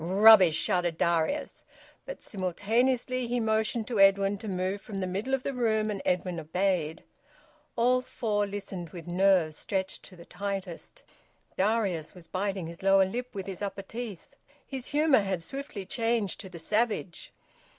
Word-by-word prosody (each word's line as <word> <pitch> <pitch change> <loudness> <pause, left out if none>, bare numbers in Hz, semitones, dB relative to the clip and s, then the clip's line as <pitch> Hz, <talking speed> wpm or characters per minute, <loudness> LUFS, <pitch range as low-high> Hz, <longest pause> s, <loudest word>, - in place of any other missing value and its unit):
"Rubbish!" 190 -2 +7
shouted 175 -1 +1
Darius. 170 - 0 0.4
But - - -7
simultaneously 235 +7 0
he 245 +1 0
motioned 220 0 0
to 230 -4 -1
Edwin 195 0 +4
to 220 - -7
move 190 +1 -2
from 200 -3 -6
the 185 - -1
middle 200 +9 -1
of 265 - -7
the 275 - -2
room, 220 -3 +1
and 200 - -4
Edwin 180 -1 -1
obeyed. 165 -1 -1 0.7
All 250 +1 +3
four 220 -5 -1
listened, 195 -4 -6
with 170 0 -9
nerves 175 -3 +2
stretched 190 -1 -2
to 185 - -13
the 170 -1 -13
tightest. 195 -4 -6 0.5
Darius 190 -6 0
was 175 -2 -11
biting 195 -1 -2
his 170 +1 -8
lower 195 0 +5
lip 245 +5 -5
with 195 -2 -4
his 190 -1 -6
upper 195 -1 -4
teeth. 220 -3 -7 0.3
His 265 -2 -5
humour 295 -2 +4
had 190 -4 -2
swiftly 270 - -6
changed 225 -1 -1
to 190 - -7
the 175 - -10
savage. 210 0 -1
195 Hz, 160 wpm, -28 LUFS, 185-225 Hz, 0.7 s, Rubbish